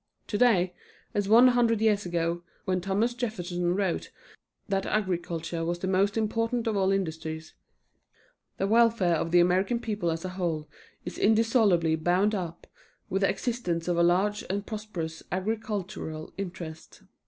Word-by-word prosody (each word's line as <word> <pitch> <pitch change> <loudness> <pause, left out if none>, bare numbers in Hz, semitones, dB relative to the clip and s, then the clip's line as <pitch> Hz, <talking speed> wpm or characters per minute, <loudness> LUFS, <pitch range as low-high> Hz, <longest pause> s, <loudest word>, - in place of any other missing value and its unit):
Today, 205 -5 +3 0.4
as 205 -1 -1
one 240 +4 +8
hundred 235 -3 +3
years 210 -3 +2
ago, 170 0 -1 0.2
when 185 -1 0
Thomas 200 +6 0
Jefferson 180 -7 -2
wrote 195 -3 -1 0.6
that 195 -1 -1
agriculture 175 -4 -2
was 170 +1 -1
the 190 - -4
most 195 +3 +2
important 230 +2 0
of 225 -2 0
all 195 -1 +2
industries, 160 -4 -3 1.0
the 195 - 0
welfare 225 -4 +4
of 165 - -1
the 175 +1 +5
American 185 +6 +2
people 210 -7 -2
as 165 +2 -3
a - - -2
whole 170 -5 -2 0.4
is - - -6
indissolubly 215 -7 +3
bound 180 +6 +2
up 175 -4 -4 0.5
with 195 - 0
the 195 - +3
existence 180 -10 -2
of 175 - +1
a 170 - +2
large 190 +5 +2
and 200 +2 -2
prosperous 190 -8 -5
agricultural 190 -5 -3
interest. 175 -4 -7
190 Hz, 145 wpm, -28 LUFS, 175-215 Hz, 1.0 s, one